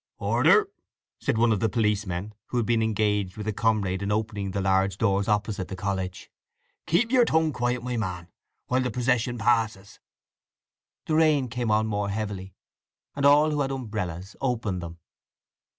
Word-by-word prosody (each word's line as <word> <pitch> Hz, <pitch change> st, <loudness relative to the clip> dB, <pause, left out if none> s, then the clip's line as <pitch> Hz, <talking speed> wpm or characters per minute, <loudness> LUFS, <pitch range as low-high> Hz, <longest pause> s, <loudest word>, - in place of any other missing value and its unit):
"Order!" 425 Hz, -2 st, +4 dB, 0.5 s
said -, -, 0 dB
one 115 Hz, 0 st, +4 dB
of 105 Hz, -, +1 dB
the 110 Hz, -, +1 dB
policemen, 105 Hz, -2 st, -1 dB
who 125 Hz, -, -3 dB
had 120 Hz, -, +1 dB
been 115 Hz, -1 st, +2 dB
engaged 105 Hz, -3 st, 0 dB
with 105 Hz, 0 st, -6 dB
a 110 Hz, -, 0 dB
comrade 100 Hz, -4 st, 0 dB
in 100 Hz, +1 st, -2 dB
opening 105 Hz, -2 st, -2 dB
the 100 Hz, -, -3 dB
large 95 Hz, 0 st, +1 dB
doors 100 Hz, -2 st, +1 dB
opposite 105 Hz, -2 st, -1 dB
the 95 Hz, -, -6 dB
college. 95 Hz, -1 st, -4 dB, 0.6 s
"Keep 225 Hz, +9 st, +2 dB
yer 255 Hz, -2 st, +5 dB
tongue 160 Hz, -7 st, +2 dB
quiet, 120 Hz, 0 st, -1 dB
my 125 Hz, -1 st, -2 dB
man, 90 Hz, -5 st, -4 dB, 0.4 s
while 130 Hz, +1 st, +1 dB
the 125 Hz, -, -1 dB
procession 125 Hz, -1 st, 0 dB
passes." 110 Hz, -4 st, 0 dB, 1.1 s
The 155 Hz, -, -2 dB
rain 155 Hz, -5 st, +3 dB
came 120 Hz, -1 st, -2 dB
on 110 Hz, +1 st, +3 dB
more 105 Hz, -2 st, -1 dB
heavily, 100 Hz, -2 st, -4 dB, 0.6 s
and 140 Hz, 0 st, +3 dB
all 150 Hz, +2 st, +5 dB
who 150 Hz, -1 st, 0 dB
had 135 Hz, -, 0 dB
umbrellas 105 Hz, -8 st, -5 dB
opened 115 Hz, -8 st, -1 dB
them. 85 Hz, 0 st, -8 dB
110 Hz, 165 wpm, -26 LUFS, 100-125 Hz, 1.1 s, yer